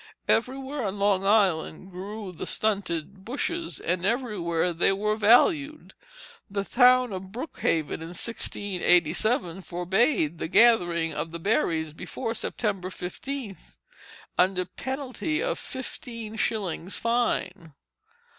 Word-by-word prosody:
Everywhere 265 +2 0
on 200 0 -3
Long 200 -1 +2
Island 190 -3 +2
grew 200 +2 -6
the 175 - -6
stunted 195 -3 -1
bushes, 330 - -3
and 175 +1 -1
everywhere 190 -7 0
they 170 +3 +3
were 210 +2 0
valued. 280 - +3 0.6
The 200 0 -2
town 250 -1 +5
of 190 0 -6
Brookhaven, 195 - -2
in 165 - -6
1687, 185 -2 +1
forbade 180 - +1
the - - -2
gathering 175 -6 +4
of 165 - -3
the 170 - -5
berries 160 -5 0
before 225 +7 -4
September 200 -4 -2
15, 210 +5 -5 0.8
under 185 0 +3
penalty 265 - -3
of - - -1
fifteen 230 -4 -6
shillings' 200 -5 -2
fine. 190 - -1
200 Hz, 110 wpm, -27 LUFS, 180-240 Hz, 0.8 s, town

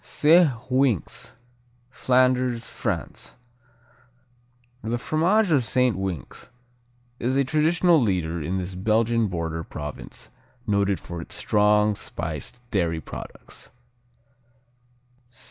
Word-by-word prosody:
Saint 165 +2 +5 0.2
Winx 130 - 0 0.6
Flanders, 125 -1 +2
France - - -5 1.5
The 115 +2 -1
fromage 175 - +2
of 140 -5 +4
Saint 125 0 +2
Winx 95 - -5 0.7
is 130 +3 0
a 140 - +4
traditional 160 +3 +3
leader 85 -6 -1
in 90 +6 -2
this 95 0 -4
Belgian 110 +4 +1
border 85 -3 -3
province 75 -5 -8 0.3
noted 100 -2 +1
for 85 -1 -7
its - - -6
strong, 105 0 +3
spiced 85 - -6
dairy 85 -5 0
products. - - -10
110 Hz, 95 wpm, -24 LUFS, 90-130 Hz, 1.5 s, Saint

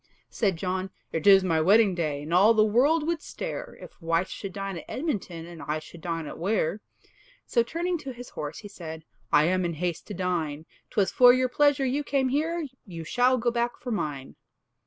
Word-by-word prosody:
Said 195 -7 0
John, 185 +2 -2 0.2
"It 160 +3 -2
is 195 -1 +8
my 165 -4 +2
wedding 200 +3 +5
day, 155 -5 -2
And 160 +3 -5
all 205 +6 +6
the 215 -1 +5
world 285 +9 +3
would 335 -1 -1
stare, - - -6
If - - -13
wife 165 +3 0
should 195 0 -6
dine 195 -2 -4
at - - -12
Edmonton, 200 - -3
And 170 -1 -10
I 150 +1 -2
should 160 +2 -11
dine 165 -2 -3
at - - -8
Ware." 195 0 0 0.6
So 235 - +2
turning 340 +8 -2
to 270 - -6
his 245 0 -10
horse, 150 -1 -5
he 210 - -9
said, 160 -5 -9 0.3
"I 150 - +6
am 185 +3 +2
in 170 -2 -2
haste 170 +1 -3
to 205 - -6
dine; 165 -4 -2 0.2
'Twas 200 -3 +1
for 245 -1 +7
your 255 0 +1
pleasure 285 +1 +3
you 275 +3 0
came 270 -2 +1
here, 320 +4 0 0.2
You 170 -5 -8
shall 245 +9 +2
go 240 0 +1
back 235 0 -1
for 250 - -5
mine." 145 - -4
195 Hz, 205 wpm, -27 LUFS, 165-250 Hz, 0.6 s, is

